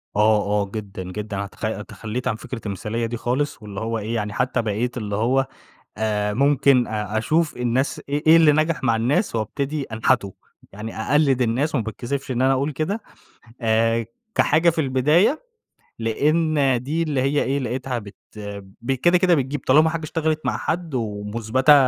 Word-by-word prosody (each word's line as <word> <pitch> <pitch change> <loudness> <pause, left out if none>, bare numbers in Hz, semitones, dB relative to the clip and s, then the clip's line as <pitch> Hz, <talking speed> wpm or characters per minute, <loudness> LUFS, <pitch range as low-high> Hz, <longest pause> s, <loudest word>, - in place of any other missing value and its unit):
آه، 105 0 +4 0.2
آه، 100 - -7
جدًا، 100 -3 -5
جدًا، 100 +2 -5
أنا 100 0 -3
تخ 110 +1 -4
تخلّيت 120 +3 -5
عن 115 - +1
فكرة 115 +1 -7
المثالية 105 +4 -3
دي 120 +1 -3
خالص، 125 +3 -1
واللي 100 -2 -7
هو 115 0 -2
إيه 110 +3 -3
يعني 105 -2 -2
حتى 125 0 0
بقيت 115 +3 -2
اللي 105 -3 -3
هو 130 +5 +2 0.5
آآ، 105 -1 0
ممكن 140 -2 +4
أ 105 0 -2
أشوف 155 +7 +1
الناس 125 +3 0
إيه 145 +2 -1
إيه 160 +1 +8
اللي 160 -2 +6
نجح 155 0 +1
مع 115 -2 +3
الناس 130 - +1
وابتدي 140 +7 -2
أنحته 110 -4 0 0.4
يعني 110 +3 -7
أقلِّد 140 0 +3
الناس، 125 +7 0
وما 115 -6 +1
باتكسفش 130 +5 -4
إن 125 0 0
أنا 135 +1 +4
أقول 140 +3 0
كده، 185 +10 -2 0.6
آآ، 115 +1 +2 0.3
كحاجة 160 +3 +4
في 165 -1 0
البداية، 150 - +2 0.6
لأن 140 +2 +2
دي 155 +5 -1
اللي 145 -5 0
هي 140 +2 +2
إيه 140 +2 0
لقيتها 125 0 -3
بت 100 -2 -12 0.7
ب 120 +3 -2
كده، 175 +7 +3
كده 180 -1 +4
بتجيب 135 0 -2
طالما 155 +4 +6
حاجة 165 0 -4
اشتغلِت 155 0 -1
مع - - 0
حد 170 -2 -3
ومُثبتة 110 +5 +2
125 Hz, 175 wpm, -22 LUFS, 110-145 Hz, 0.7 s, إيه